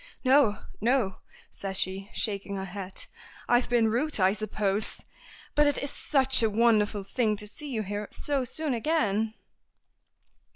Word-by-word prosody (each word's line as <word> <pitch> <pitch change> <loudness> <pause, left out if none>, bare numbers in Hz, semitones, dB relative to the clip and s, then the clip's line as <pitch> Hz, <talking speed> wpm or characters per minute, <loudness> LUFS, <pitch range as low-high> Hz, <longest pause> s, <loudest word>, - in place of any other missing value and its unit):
"No, 260 -5 +4 0.2
no!" 230 -5 +1 0.3
says 195 -1 -3
she, 190 +2 +1
shaking 200 -2 -2
her 190 0 -4
head. 190 0 -4 0.4
"I've 240 +1 +2
been 235 -2 +3
rude, 245 +5 -1
I 190 +1 +4
suppose. 210 -1 -2 0.5
But 295 0 +4
it 290 - +2
is 280 - -1
such 265 -3 +4
a 225 - +3
wonderful 210 -2 +2
thing 215 +1 0
to 210 - -5
see 290 +8 -7
you 225 -5 -2
here 205 +1 -4
so 280 -2 0
soon 295 +3 -3
again." 225 -5 0
220 Hz, 150 wpm, -28 LUFS, 200-260 Hz, 0.5 s, No